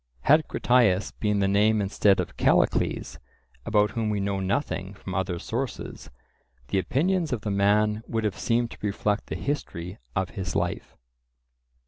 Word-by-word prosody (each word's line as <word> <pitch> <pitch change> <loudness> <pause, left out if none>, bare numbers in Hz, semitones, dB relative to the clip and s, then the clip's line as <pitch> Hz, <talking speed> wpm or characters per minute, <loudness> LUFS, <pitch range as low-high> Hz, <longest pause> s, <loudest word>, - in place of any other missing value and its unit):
Had 155 - +4
Critias 115 -6 +2
been 105 -2 0
the 100 - +3
name 105 +2 +3
instead 100 0 +3
of - - -3
Callicles, - - +1 0.5
about 105 -2 +3
whom 115 -2 -1
we 105 -1 0
know 100 0 -1
nothing 95 0 -2
from 95 -1 -8
other 95 -2 -1
sources, 120 +8 -5 0.6
the 95 - +2
opinions 165 - 0
of 120 -4 -1
the 105 - -3
man 105 +2 +2
would 115 -1 -2
have 105 -3 -1
seemed 120 0 0
to - - -10
reflect 105 0 -1
the - - -4
history 90 - -4 0.2
of 95 -2 -1
his 90 -2 -5
life. - - -2
105 Hz, 155 wpm, -26 LUFS, 95-115 Hz, 0.6 s, Had